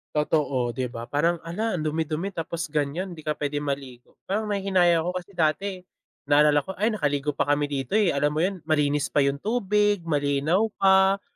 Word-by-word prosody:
Totoo, 140 Hz, -5 st, 0 dB
di 125 Hz, 0 st, -3 dB
ba, 115 Hz, 0 st, -7 dB
parang 165 Hz, +6 st, +1 dB
hala 200 Hz, +4 st, -2 dB
ang 155 Hz, -, -3 dB
dumi-dumi 160 Hz, +4 st, -2 dB
tapos 165 Hz, 0 st, -4 dB
ganyan, 155 Hz, +5 st, -2 dB
di 155 Hz, -, -11 dB
ka 150 Hz, 0 st, -3 dB
pwedeng 145 Hz, 0 st, -2 dB
maligo 130 Hz, -3 st, -7 dB
parang 210 Hz, +3 st, -2 dB
nanghihinayang 185 Hz, -5 st, +2 dB
ako 180 Hz, -, 0 dB
kasi 180 Hz, -, -20 dB
dati, 160 Hz, +5 st, +1 dB, 0.6 s
naalala 145 Hz, 0 st, +4 dB
ko 190 Hz, -, -5 dB
ay 215 Hz, -, +3 dB
nakaligo 145 Hz, -9 st, -1 dB
pa -, -, +2 dB
kami 145 Hz, 0 st, -1 dB
dito 135 Hz, -3 st, -4 dB
eh, 210 Hz, -3 st, +4 dB
alam 145 Hz, 0 st, +1 dB
mo 155 Hz, -, 0 dB
yun 190 Hz, +2 st, 0 dB
malinis 150 Hz, -2 st, +1 dB
pa 145 Hz, -, +4 dB
yung 140 Hz, 0 st, +1 dB
tubig, 205 Hz, 0 st, +1 dB
malinaw 150 Hz, +4 st, +1 dB, 0.2 s
pa, 190 Hz, 0 st, +5 dB
155 Hz, 185 wpm, -25 LUFS, 145-190 Hz, 0.6 s, pa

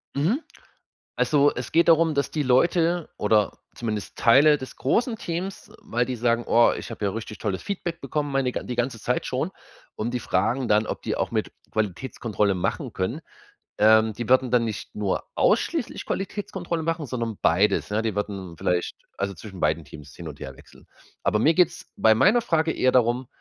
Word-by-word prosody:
Mhm. 190 Hz, -, +1 dB, 0.8 s
Also 145 Hz, -1 st, +3 dB
es -, -, -6 dB
geht 170 Hz, +1 st, +4 dB
darum, 165 Hz, -1 st, +5 dB
dass 140 Hz, -, 0 dB
die 150 Hz, -, -1 dB
Leute 170 Hz, +6 st, +2 dB
oder 105 Hz, -1 st, +1 dB, 0.2 s
zumindest 110 Hz, -3 st, -4 dB
Teile 145 Hz, +6 st, +6 dB
des 130 Hz, -2 st, -9 dB
großen 225 Hz, -, +1 dB
Teams 185 Hz, 0 st, -5 dB
weil 120 Hz, +1 st, -1 dB
die 130 Hz, -, -3 dB
sagen: 120 Hz, 0 st, +1 dB
„Oha, 120 Hz, 0 st, +5 dB
ich -, -, -7 dB
hab 110 Hz, -, -8 dB
ja 100 Hz, -, +1 dB
richtig 110 Hz, -1 st, -6 dB
tolles 95 Hz, -2 st, -3 dB
Feedback 175 Hz, -4 st, -4 dB
bekommen, 145 Hz, +2 st, -2 dB
meine 135 Hz, -2 st, 0 dB
die 125 Hz, -, -4 dB
ganze 120 Hz, -1 st, -1 dB
Zeit -, -, -1 dB
schon", -, -, -2 dB, 0.5 s
und 115 Hz, +3 st, -3 dB
die 125 Hz, -, -1 dB
fragen 115 Hz, +8 st, 0 dB
dann, 105 Hz, +1 st, +3 dB
ob -, -, -5 dB
die -, -, -2 dB
auch -, -, -1 dB
mit -, -, -2 dB, 0.2 s
Qualitätskontrolle 105 Hz, 0 st, -1 dB
machen 90 Hz, -, -2 dB
können. 115 Hz, -, -2 dB, 0.6 s
Ähm, 110 Hz, +1 st, +5 dB
die 120 Hz, +2 st, -6 dB
würden 130 Hz, -1 st, +4 dB
dann 120 Hz, -2 st, +3 dB
nicht 110 Hz, -2 st, -5 dB
nur 105 Hz, -2 st, -1 dB
ausschließlich -, -, +1 dB
Qualitätskontrolle 190 Hz, -4 st, -3 dB
machen, 165 Hz, -2 st, -1 dB
sondern 115 Hz, -4 st, -3 dB
beides, 100 Hz, +5 st, +2 dB
ne. 105 Hz, +2 st, 0 dB
Die 110 Hz, -1 st, -1 dB
würden 95 Hz, -4 st, -4 dB
vielleicht 90 Hz, +1 st, -1 dB, 0.2 s
also 100 Hz, 0 st, -2 dB
zwischen 95 Hz, 0 st, -10 dB
beiden 80 Hz, +1 st, +1 dB
Teams 75 Hz, 0 st, -12 dB
hin 85 Hz, -2 st, -8 dB
und 75 Hz, -, -9 dB
her 65 Hz, 0 st, -7 dB
wechseln. -, -, -18 dB, 0.4 s
Aber 105 Hz, -, +2 dB
mir 155 Hz, +8 st, +4 dB
geht's 180 Hz, -3 st, +1 dB
bei 110 Hz, -, +5 dB
meiner 205 Hz, -, +4 dB
Frage 160 Hz, -7 st, +1 dB
eher 130 Hz, -, +2 dB
darum, 125 Hz, 0 st, +2 dB
120 Hz, 185 wpm, -25 LUFS, 105-155 Hz, 0.8 s, Teile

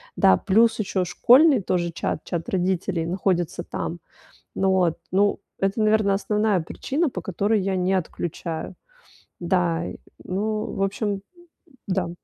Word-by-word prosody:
да, 95 Hz, -1 st, +5 dB
плюс 225 Hz, -, +3 dB
еще 190 Hz, -3 st, -1 dB
школьный 260 Hz, -, +5 dB
тоже 175 Hz, -2 st, 0 dB
чат- -, -, -3 dB
чат 170 Hz, -1 st, -4 dB
родителей, 180 Hz, -2 st, -1 dB
находится 175 Hz, -2 st, -1 dB
там. 170 Hz, -, -4 dB, 0.6 s
Ну 190 Hz, 0 st, +2 dB
вот. 180 Hz, -4 st, +2 dB
Ну, 200 Hz, +2 st, +2 dB, 0.2 s
это, 195 Hz, +3 st, 0 dB
наверно, 215 Hz, -2 st, +3 dB
основная 210 Hz, -1 st, +1 dB
причина, 280 Hz, -, -2 dB
по 185 Hz, -, -5 dB
которой 200 Hz, +5 st, 0 dB
я 190 Hz, 0 st, -1 dB
не 185 Hz, +1 st, +1 dB
отключаю. 170 Hz, -2 st, -3 dB, 0.7 s
Да, 170 Hz, -1 st, 0 dB, 0.4 s
ну, 215 Hz, +3 st, -2 dB
в 195 Hz, -, -3 dB
общем, 200 Hz, 0 st, -1 dB, 0.7 s
да. 185 Hz, -3 st, -1 dB
190 Hz, 130 wpm, -24 LUFS, 175-210 Hz, 0.7 s, да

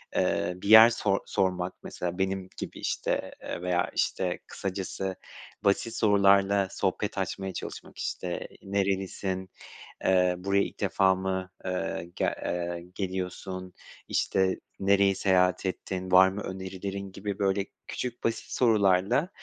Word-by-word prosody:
eee, 90 Hz, -, +1 dB
bir 100 Hz, +3 st, -6 dB
yer 110 Hz, +1 st, +11 dB
sor 105 Hz, -4 st, +1 dB
sormak 90 Hz, -2 st, 0 dB
mesela 90 Hz, 0 st, -4 dB
benim 95 Hz, -1 st, -1 dB
gibi, -, -, -6 dB
işte, -, -, -1 dB
eee, -, -, -5 dB
veya, 90 Hz, -1 st, +1 dB
işte, 90 Hz, -2 st, 0 dB
kısacası 95 Hz, 0 st, -4 dB, 0.5 s
basit 105 Hz, +3 st, +1 dB
sorularla 100 Hz, -1 st, +4 dB
sohbet -, -, -1 dB
açmaya 95 Hz, -1 st, -3 dB
çalışmak, -, -, -7 dB
işte, 90 Hz, -1 st, -3 dB, 0.2 s
"Nerelisin?", 95 Hz, -1 st, -1 dB, 0.6 s
eee, 90 Hz, -1 st, +4 dB
"Buraya 100 Hz, +2 st, +2 dB
ilk -, -, -6 dB
defa 95 Hz, 0 st, +3 dB
mı, 95 Hz, 0 st, -3 dB
eee, 90 Hz, -2 st, -3 dB
gel -, -, +1 dB
eee, 85 Hz, 0 st, -3 dB
geliyorsun?", 95 Hz, -1 st, -4 dB, 0.3 s
işte, 95 Hz, -1 st, +1 dB, 0.2 s
"Nereyi 100 Hz, 0 st, +4 dB
seyahat 90 Hz, -1 st, +2 dB
ettin, 95 Hz, 0 st, -4 dB
var 95 Hz, +1 st, +8 dB
mı 95 Hz, +2 st, -4 dB
önerilerin?" 95 Hz, +1 st, -5 dB
gibi, 100 Hz, 0 st, -4 dB
böyle 100 Hz, -1 st, +1 dB, 0.2 s
küçük 125 Hz, -1 st, -5 dB
basit 115 Hz, -, -1 dB
sorularla, 105 Hz, -, +3 dB
95 Hz, 125 wpm, -28 LUFS, 90-100 Hz, 0.6 s, yer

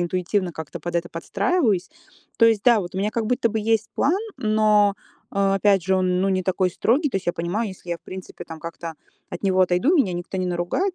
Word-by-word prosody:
интуитивно 180 Hz, +1 st, -1 dB
как-то 160 Hz, -2 st, -7 dB
под 175 Hz, 0 st, -5 dB
это 170 Hz, 0 st, -2 dB
подстраиваюсь. 200 Hz, -, 0 dB, 0.5 s
То 230 Hz, -, +5 dB
есть, 225 Hz, -3 st, +3 dB
да, 235 Hz, -4 st, +5 dB
вот 175 Hz, 0 st, -7 dB
у -, -, -2 dB
меня 205 Hz, +2 st, 0 dB
как 225 Hz, 0 st, -2 dB
будто 240 Hz, 0 st, +1 dB
бы 220 Hz, 0 st, -2 dB
есть 220 Hz, 0 st, +1 dB
план, 335 Hz, +8 st, +2 dB, 0.2 s
но, 215 Hz, -2 st, +3 dB, 0.4 s
а, 195 Hz, -1 st, +1 dB
опять 195 Hz, -1 st, +3 dB
же, 190 Hz, +2 st, +2 dB
он 180 Hz, -1 st, +1 dB
ну 195 Hz, -, +2 dB
не 185 Hz, -1 st, +1 dB
такой 185 Hz, 0 st, +1 dB
строгий. 275 Hz, -, +1 dB
То 195 Hz, -, -1 dB
есть 195 Hz, -, -5 dB
я 175 Hz, -, +2 dB
понимаю: 185 Hz, +7 st, -2 dB
если 185 Hz, -2 st, -10 dB
я, 170 Hz, -, -1 dB
в -, -, -33 dB
принципе, 185 Hz, 0 st, -9 dB
там 160 Hz, -1 st, -9 dB
как-то 165 Hz, 0 st, -7 dB, 0.4 s
от -, -, -7 dB
него 185 Hz, -1 st, +2 dB
отойду, 180 Hz, -, +2 dB
меня 210 Hz, -, +2 dB
никто 175 Hz, +2 st, -5 dB
не 185 Hz, -, -1 dB
наругает, 180 Hz, -, -1 dB
195 Hz, 230 wpm, -23 LUFS, 175-220 Hz, 0.5 s, То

